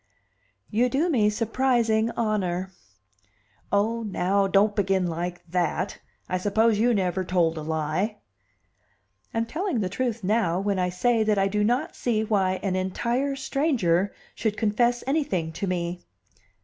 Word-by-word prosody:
"You 240 +3 +2
do 310 +7 +1
me 215 -7 +3
surprising 230 0 +1
honor." 190 -5 -1 1.0
"Oh, 220 +3 +1
now, 195 -1 +1
don't 205 +2 +3
begin 195 -2 +1
like 175 +1 -4
that! 180 +2 -1 0.3
I 185 - -1
suppose 210 +3 +2
you 240 +2 +4
never 185 -1 0
told 175 -3 +1
a 155 - -5
lie." 160 +7 -1 1.1
"I'm 225 0 0
telling 315 - -2
the 185 - -1
truth 230 +1 -2
now 185 -4 +1
when 195 -1 0
I 180 0 +1
say 225 +6 +1
that 215 -1 +2
I 195 0 +3
do 210 +1 0
not 245 +8 0
see 220 -3 0
why 195 -4 +1
an 190 -2 0
entire 235 +9 -1
stranger 240 - +1 0.2
should 215 -2 -2
confess 240 +3 +1
anything 270 - 0
to 195 - -3
me." 175 -1 -2
205 Hz, 145 wpm, -25 LUFS, 185-230 Hz, 1.1 s, you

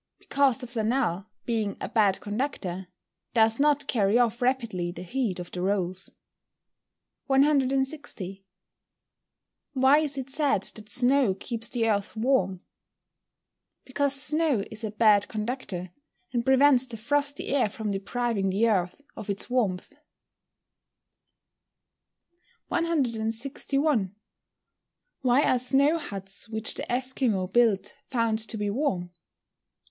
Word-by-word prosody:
_ - - -59
Because 275 -3 +1
the 255 - -6
flannel, 225 -5 -1 0.2
being 220 -4 -1
a - - -4
bad 205 -4 +2
conductor, 205 -5 -3 0.5
does 225 +1 +3
not 290 0 +3
carry 215 -2 +2
off 240 0 +1
rapidly 230 -9 0
the 175 - -8
heat 225 0 -2
of 175 - -7
the 180 - -5
rolls. 185 -1 -2 1.1
160. 270 - 0 1.3
Why 270 +2 +5
is 290 -3 -1
it 265 0 -4
said 285 0 +2
that 215 -1 -6
snow 250 -4 +2
keeps 230 +3 -3
the 230 -2 0
earth 205 -1 -1
warm? 205 -7 +1 1.2
Because 275 +1 +2
snow 300 -7 +2
is 220 +1 -5
a 220 - -2
bad 210 -1 +4
conductor, 210 -5 -4 0.4
and 240 -1 0
prevents 265 0 +5
the 235 -2 -6
frosty 285 +5 -1
air 265 -6 +2
from 215 0 -4
depriving 200 0 -1
the 205 +5 +2
earth 185 +5 -1
of 210 - -8
its 200 +4 -2
warmth. 215 -2 -1 2.8
161. 270 - 0 1.1
_Why 255 +3 +4
are 255 - +3
snow 280 +6 +3
huts 195 - -4
which 220 0 0
the - - -5
Esquimaux 250 -6 0
build 215 0 +2
found 230 -3 0
to 220 0 -3
be 205 -1 -1
warm? 200 -9 -1
230 Hz, 120 wpm, -27 LUFS, 200-270 Hz, 2.8 s, Why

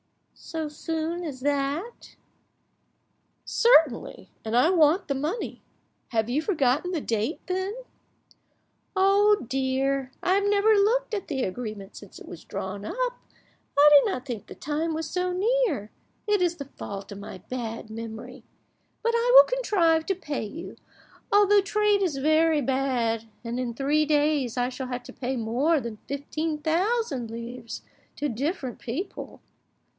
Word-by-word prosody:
"So 320 -1 -5
soon 325 +3 -3
as 280 -6 -6
that?" 290 - -2 1.3
"Certainly, 320 - +3
and 225 +1 0
I 310 +8 +5
want 330 +1 +4
the 275 - 0
money. 305 - -3 0.5
Have 225 -2 0
you 260 +5 0
forgotten 310 - +1
the 345 - -1
date, 225 +2 -1
then?" 375 +2 -2 1.2
"Oh 400 -2 +4
dear, 265 +1 0
I 365 - +3
have 400 +1 +2
never 415 +2 +4
looked 445 +4 +2
at 400 -3 -3
the 265 -4 -1
agreement 205 -1 -5
since 205 - -12
it - - -12
was 170 - -10
drawn 195 +1 -5
up. - - -2 0.6
I 290 +1 +8
did 295 +7 +7
not 255 -8 -4
think 240 -6 -6
the - - -10
time 310 +2 -2
was 320 0 -3
so 360 +3 -1
near, 405 - 0 0.4
it 415 -2 +2
is 350 -1 +2
the 280 - -6
fault 200 -7 -8
of 200 - -7
my 200 -2 -8
bad 225 +1 -6
memory; 230 +3 -8 0.6
but 465 0 +2
I 470 +1 +2
will - - +11
contrive 345 -10 +2
to 385 - +1
pay 295 -8 -4
you, 305 +11 -8 0.5
although 410 0 +6
trade 415 0 +2
is 340 -8 0
very 310 +2 +3
bad, 245 -4 0 0.2
and 235 +1 -3
in 240 -2 -3
three 290 +4 +2
days 295 -5 +1
I 245 0 +1
shall 260 0 -5
have 250 -1 -4
to - - -11
pay 260 0 -3
more 255 +8 +1
than 230 -4 -6
fifteen 305 +3 -3
thousand 325 - 0
livres 235 +1 -7 0.3
to 295 - -1
different 270 - -3
people." 280 - -6
295 Hz, 150 wpm, -26 LUFS, 245-365 Hz, 1.3 s, will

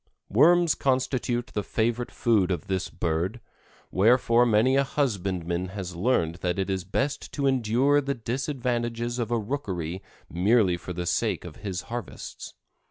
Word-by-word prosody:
Worms 170 - +5
constitute 130 -2 0
the 105 - 0
favorite 120 +3 -1
food 105 -6 +2
of 90 -5 -2
this 95 -1 -2
bird, 85 +8 -2 0.5
wherefore 120 +3 +4
many 115 +4 +4
a 140 - +4
husbandman 95 - -1
has 95 -3 -5
learned 85 -4 +1
that 90 0 -2
it 95 0 -1
is 95 -2 -2
best 135 +10 -2
to 140 - -1
endure 130 +3 +3
the 140 0 -2
disadvantages 120 -1 -2
of 115 -2 -1
a 120 - +1
rookery 95 - -3 0.3
merely 95 +1 +3
for 85 +1 -7
the 90 0 -4
sake - - 0
of - - -9
his 95 -3 -4
harvests. 120 -4 -7
115 Hz, 150 wpm, -26 LUFS, 95-125 Hz, 0.5 s, Worms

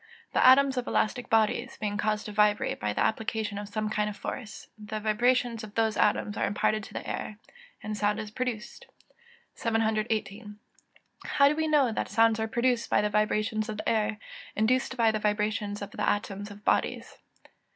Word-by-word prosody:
_ - - -38
The - - +3
atoms 265 +1 +6
of 250 - -2
elastic 245 +3 0
bodies 225 +3 +1
being 210 -1 -2
caused 210 0 -1
to 210 - -6
vibrate 210 0 +2
by 105 0 -1
the - - 0
application 220 -2 -2
of 205 0 -7
some 215 +1 -2
kind 210 -1 0
of 205 - -8
force, 220 -5 -7
the 215 0 -6
vibrations 230 +2 +1
of 215 -1 -10
those 225 -1 +1
atoms 205 0 +1
are - - +1
imparted 215 +1 0
to - - -13
the - - -5
air, 210 - -4 0.5
and 215 0 -3
sound 210 +1 0
is 215 -1 -6
produced. 235 -2 -5 0.7
718. 220 -2 -1 0.7
_How 280 -1 +4
do 300 - 0
we 315 0 0
know 290 -6 +3
that - - -3
sounds 225 -1 +3
are 220 - 0
produced 240 +1 0
by - - +3
the 210 0 -1
vibrations 215 +1 0
of 215 - -4
the - - -5
air, 215 -1 +1 0.4
induced 255 +4 +1
by 230 -2 +4
the 215 - -2
vibrations 210 0 -1
of 200 - -8
the - - -1
atoms 205 0 -2
of 205 +1 -13
bodies? - - 0
215 Hz, 190 wpm, -28 LUFS, 210-230 Hz, 0.7 s, atoms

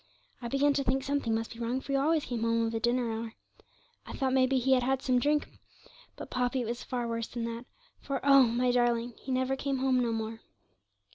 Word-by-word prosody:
I 240 - -4
began 275 +3 +2
to 280 0 0
think 265 +1 0
something 275 -5 0
must 225 +1 -3
be 230 - -13
wrong, 240 +2 -1
for 275 - -7
he - - +1
always 300 +3 +2
came 240 -3 -4
home 230 0 +1
of 225 - -3
a 225 - -1
dinner 240 0 +1
hour. 225 0 -5 0.7
I - - -9
thought 265 -2 -1
maybe 260 0 +3
he 260 +1 +3
had 255 - +3
had 265 +1 0
some 255 -1 +2
drink; 295 +3 +1 0.7
but, - - -9
Poppy, 250 +1 0
it - - -3
was 235 +2 -6
worse 230 -2 -2
than 240 -1 -5
that, 230 +1 -5 0.3
for 275 -2 -3
oh! 275 -1 +7
my 245 +2 +1
darling, 240 -1 +1
he 265 - -6
never 260 +1 +1
came 275 0 -2
home 260 -1 +2
no 240 -2 0
more.' 225 0 -4
250 Hz, 225 wpm, -30 LUFS, 230-270 Hz, 0.7 s, oh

